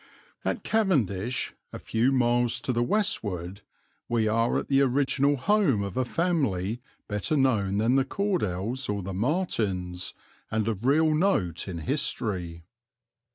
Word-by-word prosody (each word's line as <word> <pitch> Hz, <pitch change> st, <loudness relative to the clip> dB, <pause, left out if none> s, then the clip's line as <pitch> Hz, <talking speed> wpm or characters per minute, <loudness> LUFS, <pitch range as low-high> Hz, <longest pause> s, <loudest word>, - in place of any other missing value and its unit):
At -, -, -2 dB
Cavendish, 125 Hz, -, 0 dB, 0.2 s
a -, -, -6 dB
few 115 Hz, +4 st, +1 dB
miles 120 Hz, -2 st, +2 dB
to 130 Hz, -, -1 dB
the 120 Hz, -, +1 dB
westward, 105 Hz, -, -1 dB, 0.5 s
we 115 Hz, -2 st, +1 dB
are 115 Hz, +2 st, +2 dB
at -, -, -3 dB
the 135 Hz, 0 st, +3 dB
original 140 Hz, +1 st, +2 dB
home 155 Hz, -, +2 dB
of 100 Hz, -2 st, -5 dB
a 130 Hz, -, +1 dB
family 120 Hz, -, 0 dB, 0.3 s
better 105 Hz, +9 st, -1 dB
known 105 Hz, -8 st, +2 dB
than 115 Hz, +5 st, +3 dB
the 135 Hz, -, +4 dB
Cordells 130 Hz, -, -2 dB
or 100 Hz, -2 st, -2 dB
the 95 Hz, +1 st, -5 dB
Martins, 95 Hz, -, -1 dB, 0.3 s
and 110 Hz, -1 st, -1 dB
of 115 Hz, +2 st, -2 dB
real 155 Hz, +3 st, +4 dB
note 150 Hz, -, +1 dB
in 90 Hz, -3 st, -4 dB
history. 85 Hz, +1 st, -2 dB
120 Hz, 140 wpm, -27 LUFS, 100-140 Hz, 0.5 s, the